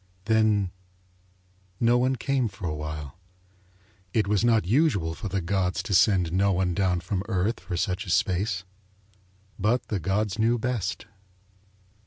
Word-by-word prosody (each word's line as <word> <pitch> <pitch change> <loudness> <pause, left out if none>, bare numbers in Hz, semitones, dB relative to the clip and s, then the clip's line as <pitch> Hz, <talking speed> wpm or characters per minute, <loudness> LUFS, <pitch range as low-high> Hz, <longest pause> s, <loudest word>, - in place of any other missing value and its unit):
Then 110 -3 +2 1.1
no 120 +1 +4
one 130 +1 +2
came 130 0 0
for 95 -3 -8
a 75 - -2
while. 75 0 -6 1.0
It 110 -3 +2
was 105 +1 +1
not 115 -4 +3
usual 105 - +2
for 100 - -6
the 95 0 -1
gods 90 +1 -1
to 110 - -3
send 90 -3 +4
no 100 +2 +3
one 90 -1 +1
down 90 -1 +1
from 95 +1 -2
Earth 100 +3 0
for 90 - -5
such 90 +2 -2
a - - -6
space. 95 0 +1 1.0
But 115 +5 0
the 105 - -1
gods 100 +3 -1
knew 115 +2 +3
best. 115 -4 -2
100 Hz, 150 wpm, -26 LUFS, 90-110 Hz, 1.1 s, no